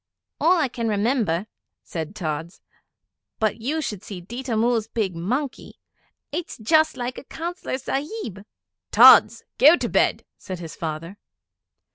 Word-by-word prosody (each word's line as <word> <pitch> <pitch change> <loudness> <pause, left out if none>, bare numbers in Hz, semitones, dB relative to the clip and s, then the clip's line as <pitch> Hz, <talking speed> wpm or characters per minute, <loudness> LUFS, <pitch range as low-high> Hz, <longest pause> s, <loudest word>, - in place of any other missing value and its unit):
'All 355 +3 +4
I 310 -5 +2
can 235 -2 -4
remember,' 210 -4 0 0.4
said 165 +3 -6
Tods. 160 -1 -4 0.8
'But 220 +1 -1
you 305 +7 -1
should 210 -8 -4
see 195 -3 -7
Ditta 240 +6 -4
Mull's 230 -1 +1
big 210 -6 -2
monkey. 250 - -4 0.5
It's 335 +3 -5
just 315 +6 +2
like 245 0 -4
a - - -13
Councillor 340 -1 -5
Sahib.' 270 - -4 0.5
'Tods! - - +7 0.2
Go 305 +5 +8
to - - -2
bed!' - - +1
said 185 -2 -6
his 165 -2 -8
father. 165 +4 -6
225 Hz, 135 wpm, -23 LUFS, 185-275 Hz, 0.8 s, Go